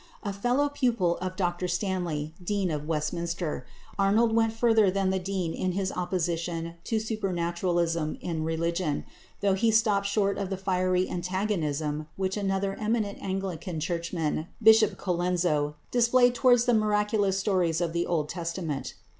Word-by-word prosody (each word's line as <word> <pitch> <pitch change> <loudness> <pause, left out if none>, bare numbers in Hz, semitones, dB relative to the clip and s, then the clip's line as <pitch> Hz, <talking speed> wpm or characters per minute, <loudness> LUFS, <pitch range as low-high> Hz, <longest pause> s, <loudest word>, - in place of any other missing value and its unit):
A 200 -2 -2
fellow 245 +8 +1
pupil 235 -11 +1
of 185 0 -4
Dr 180 -1 -1
Stanley, 175 -5 -2
Dean 195 -1 0
of 150 -1 -3
Westminster, 165 -2 -2 0.3
Arnold 220 +3 +3
went 225 -1 +3
further 225 -3 +4
than 195 0 +1
the 190 - 0
Dean 185 -3 -2
in 185 -1 -1
his 190 0 -1
opposition 170 -2 -2
to 225 - 0
supernaturalism 175 -6 -1
in 165 -3 -3
religion, 165 -1 -1 0.4
though 200 -1 +3
he 210 +4 +2
stopped 215 -3 +3
short 200 -1 +1
of 195 -2 -2
the 195 - -2
fiery 185 -1 +1
antagonism 160 -5 -2
which 190 0 -1
another 195 -1 -1
eminent 215 -2 -1
Anglican 190 -3 -3
churchman, 165 -1 -2
Bishop 220 -1 +6
Colenso, 175 -5 0 0.2
displayed 245 +1 +4
towards 245 -1 +4
the 245 - +3
miraculous 210 -2 +2
stories 185 -5 +1
of 170 -2 -1
the 170 0 0
Old 160 -4 0
Testament. 165 -3 -4
185 Hz, 145 wpm, -27 LUFS, 170-205 Hz, 0.4 s, Bishop